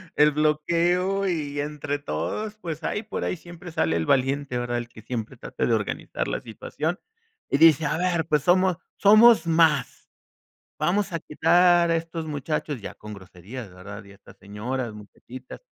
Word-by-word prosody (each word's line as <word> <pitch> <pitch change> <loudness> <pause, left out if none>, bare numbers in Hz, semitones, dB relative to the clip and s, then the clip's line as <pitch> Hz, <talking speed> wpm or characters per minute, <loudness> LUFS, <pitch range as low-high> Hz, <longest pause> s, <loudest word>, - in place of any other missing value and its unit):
el 150 0 +5
bloqueo, 170 +6 +1
y 150 -5 -2
entre 145 0 -3
todos, 145 - -4
pues, 165 -6 -7
ahí 210 - -2
por 215 - -5
ahí - - -1
siempre 175 +1 -11
sale 80 - 0
el 80 - -1
valiente 135 - +1
¿verdad?, 120 0 -2
el 120 0 -4
que 115 -2 -14
siempre 115 -1 -5
trata - - -3
de - - +1
organizar - - -2
la - - -2
situación 155 - -4 0.5
y - - +2
dice:"A 160 -1 +5
ver, 175 -2 0
pues, 150 -3 +1
somos 185 0 +3 0.2
somos 215 +1 +7
más, 165 -1 +2 0.7
vamos 200 +2 +1
a 165 - -2
quitar 175 +3 +3
a - - +3
estos 165 0 -4
muchachos", 150 -1 -3
ya - - -7
con 105 0 -10
groserías, 100 +4 -10
¿verdad?, 100 +3 -10
y 100 - -15
a - - -15
estas 100 - -18
señoras, 110 +4 -5
muchachitas, 120 +4 -12
150 Hz, 170 wpm, -25 LUFS, 120-175 Hz, 0.7 s, somos